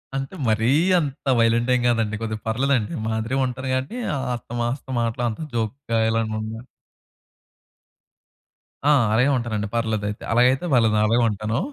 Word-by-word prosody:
అంటే 135 +6 -4
మరీ 110 +1 +2 0.3
అంత 140 -2 -5
వైలెంట్ 115 +2 +2
ఏం 125 - 0
గాదండి. 115 -3 +1
కొద్దిగా 110 -1 -4
పర్లేదండి 125 -1 0
మాదిరి‌గా 115 +4 -1
ఉంటాను 130 +1 -5
గాని 135 - -3 0.4
అత్తమాస్తం 120 +3 -4
మాటలు 115 +1 -1
అంత 110 - -6 0.2
జోక్‌గా 115 +1 -2
ఇలాగుండను. 110 0 -2 2.3
ఆ! - - +7 0.2
అలాగే 125 +5 +3
ఉంటానండి. 110 -3 -2
పర్లేదయితే. 110 -3 -2
అలాగైతే 125 +6 +3
పర్లేదు 115 -3 +4
నేను 105 - +3
అలాగే 120 +1 +3
ఉంటాను. 105 +4 -2
115 Hz, 130 wpm, -23 LUFS, 110-130 Hz, 2.3 s, ఆ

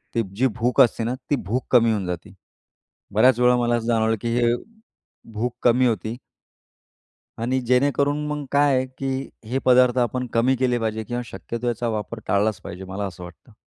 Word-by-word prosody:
ती 115 - +3
जी 130 +4 +3
भूक 120 +1 +3
असते 115 -1 +3
ना, 120 +3 -1
ती 145 - +3
भूक 120 +2 -3
कमी 115 -2 +5
होऊन 105 -4 -1
जाते. 90 -2 -6 0.8
बऱ्याच 120 +3 +4
वेळा 125 0 +5
मला 120 0 +1
असं 115 0 -3
जाणवलं, 110 -1 +2
की 115 - -2
हे 120 -1 +3 0.8
भूक 120 +3 -2
कमी 125 +1 +4
होती 110 +1 -2 1.3
आणि 130 +2 0
जेणेकरून 140 +4 +1
मग 150 -1 -3
काय 145 -1 +4
आहे, 130 0 0
की 135 +1 -4 0.2
हे 130 +2 0
पदार्थ 125 0 +5
आपण 125 +1 0
कमी 125 +3 +3
केले 125 -1 +1
पाहिजे 110 -1 -2
किंवा 120 +3 -3
शक्यतो 115 +3 -6
याचा 120 0 -1
वापर 110 +2 -6
टाळलाच 105 0 +1
पाहिजे. 90 +2 -8
मला 95 +2 -5
असं 90 -1 -8
वाटतं. 90 +6 -14
120 Hz, 180 wpm, -23 LUFS, 110-130 Hz, 1.3 s, कमी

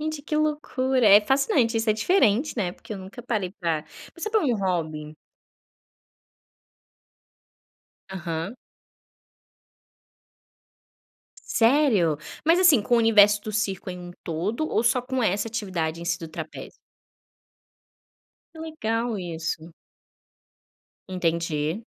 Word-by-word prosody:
Gente 310 -1 -4
que 305 +1 -2
loucura, 265 -5 +1
é 205 +1 +9
fascinante 255 0 +2
isso 225 0 +1
é - - +5
diferente, 245 - +2
né, 185 -5 -1
porque 215 - -11
eu - - -7
nunca 190 +5 -10
parei 215 -6 -2
pra, 160 -3 -1 0.3
pensar 380 +5 -5
pelo 435 -4 +2
um 240 -3 +1
hobby. 155 -5 -3 2.9
Aham. 170 +3 -4 2.8
Sério? 225 - +2 0.3
Mas, 330 +3 +4
assim, 335 - +6
com 240 - +1
o - - +5
universo 210 -2 +5
do 215 - -6
circo 195 -3 -2
em 180 - -7
um 175 0 -9
todo 200 - -2
ou - - +1
só 240 +2 +3
com 260 0 -2
essa 205 +2 0
atividade 185 -8 -3
em - - -7
si 170 0 -1
do 165 -3 -8
trapézio? 160 0 -8 1.8
Que 320 - -13
legal 235 -8 -2
isso. 165 -2 -5 1.4
Entendi. 170 0 -1
210 Hz, 115 wpm, -25 LUFS, 170-255 Hz, 2.9 s, é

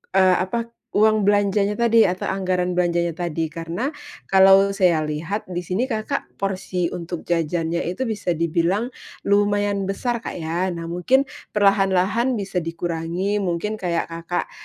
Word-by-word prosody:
eee, 185 -1 +5
apa, 230 +5 -2 0.2
uang 215 0 +3
belanjanya 205 +1 +2
tadi 230 -1 +5
atau 185 +1 -1
anggaran 180 -2 -1
belanjanya 170 -2 +1
tadi. 165 -2 -2
Karena, 170 - -4 0.4
kalau 195 +1 +6
saya 180 -5 +3
lihat, 165 +8 -3
di 180 -1 -4
sini, 200 +9 -1
Kakak, 225 +4 -3
porsi 185 -3 -2
untuk 170 -1 -5
jajannya 170 0 -1
itu 185 +9 -2
bisa 210 -7 -2
dibilang 170 +8 0 0.3
lumayan 205 -1 +1
besar, 235 +5 -1
Kak, - - -6
ya. 170 +3 -2
Nah, 170 -2 -4
mungkin 250 +11 +3 0.3
perlahan-lahan 200 +4 +3
bisa 195 -3 -2
dikurangi, 170 +4 -2
mungkin 200 +3 -2
kayak, 170 -2 0
Kakak, 170 +1 -3
185 Hz, 140 wpm, -22 LUFS, 170-205 Hz, 0.4 s, kalau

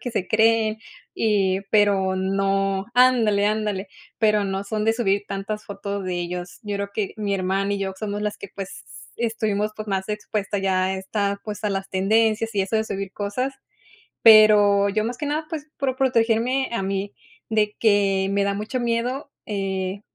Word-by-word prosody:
que 245 - -4
se 185 -5 -2
creen, 220 0 +3 0.4
y, 195 -3 +1
pero, 200 -3 +3
no 195 +1 0
ándale, 235 -5 +4
ándale, 210 -2 -1 0.3
pero 210 -2 +3
no 195 0 -2
son 210 +1 -2
de 225 - +4
subir 205 -3 0
tantas 200 +2 -4
fotos 200 -1 -5
de 185 -1 -2
ellos. 175 0 -5
Yo 205 -2 -3
creo 200 0 -4
que 210 -3 -2
mi 205 -2 -1
hermana 195 +1 0
y - - -3
yo 195 -1 -2
somos 205 0 -3
las 210 0 -2
que, 200 - -8
pues, 195 -1 -7 0.3
estuvimos, 220 -3 -1
pues, 215 - -6
más 195 -1 -2
expuestas 210 -1 -3
ya 190 -1 +1
a 190 - -1
esta, 200 +1 -2
pues, 210 -1 -6
a 210 - 0
las 195 0 -3
tendencias 220 +3 +1
y 200 - +2
eso 190 +3 -4
de 220 - +3
subir 195 -2 -5
cosas. 230 +7 -3 0.7
Pero, 210 -2 +7
yo, 215 +2 0
más 240 +2 -3
que 295 - -2
nada, 305 +2 -1
pues, 305 -2 -6
por 265 -3 -1
protegerme 255 0 +1
a 230 - -1
mí, 195 +1 -3 0.4
de 210 -1 +1
que 195 -3 +3
me 200 0 +2
da 200 0 0
mucho 215 +5 -3
miedo, 240 +4 -1 0.2
eh, 195 -1 -3
205 Hz, 180 wpm, -23 LUFS, 195-220 Hz, 0.7 s, Pero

